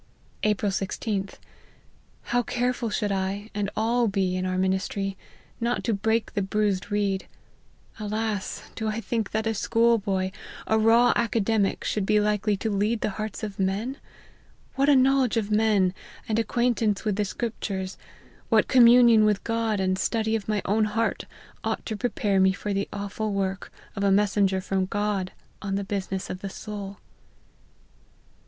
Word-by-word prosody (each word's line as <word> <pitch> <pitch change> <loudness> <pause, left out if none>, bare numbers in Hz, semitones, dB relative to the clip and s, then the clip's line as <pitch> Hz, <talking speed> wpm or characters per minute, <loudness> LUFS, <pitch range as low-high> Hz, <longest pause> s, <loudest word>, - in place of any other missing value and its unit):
" - - -33
April 205 -1 0
IG'A. 195 +1 -3 0.9
How 245 0 +1
careful 245 0 -1
should 210 -1 -1
I, 195 +2 -2
and 205 -1 -1
all 235 +2 +2
be, 190 -2 0
in 185 0 -1
our 185 0 -1
ministry, 190 +1 -1 0.4
not 240 +1 -1
to 230 - +1
break 220 +3 0
the 200 - 0
bruised 200 -1 0
reed! 200 -2 0 0.7
Alas! 215 -1 -3
do 220 - -4
1 215 +1 -1
think 225 -3 -1
that 220 +1 -1
a 225 - +1
schoolboy, 210 -4 +1 0.3
a 220 - +2
raw 230 +2 +5
academic, 225 -3 +1
should 200 -2 -1
be 210 - +4
likely 210 0 +1
to 220 +2 -2
lead 210 +3 0
the 210 - 0
hearts 215 -1 -5
of 205 -2 -5
men? 205 +8 -1 0.8
what 275 +1 +2
a 285 - +7
knowledge 260 -2 +3
of 215 -2 -1
men, 210 -4 +3 0.3
and 220 0 +1
acquaintance 225 -2 +1
with 210 -2 +1
the 210 - +1
Scriptures, 195 -3 -4 0.5
what - - +4
communion 240 -3 +7
with 210 -2 +2
God, 230 -2 0
and 185 0 0
study 220 -1 0
of 215 -3 -4
my 210 -2 0
own 215 +3 +2
heart, 220 +2 -1 0.4
ought - - -2
to 220 - -3
prepare 205 -3 0
me 190 0 +4
for 205 +1 -3
the 200 0 -1
aw 205 0 -4
ful 215 +2 -3
work 195 -1 -2 0.2
of 200 - -2
a 200 - +4
messenger 195 -1 +2
from 190 0 -1
God 200 -2 -1 0.3
on 195 -2 -2
the 200 - -1
business 195 -1 -3
of 185 - -6
the 195 - -4
soul 200 -1 -7
210 Hz, 165 wpm, -26 LUFS, 195-225 Hz, 0.9 s, a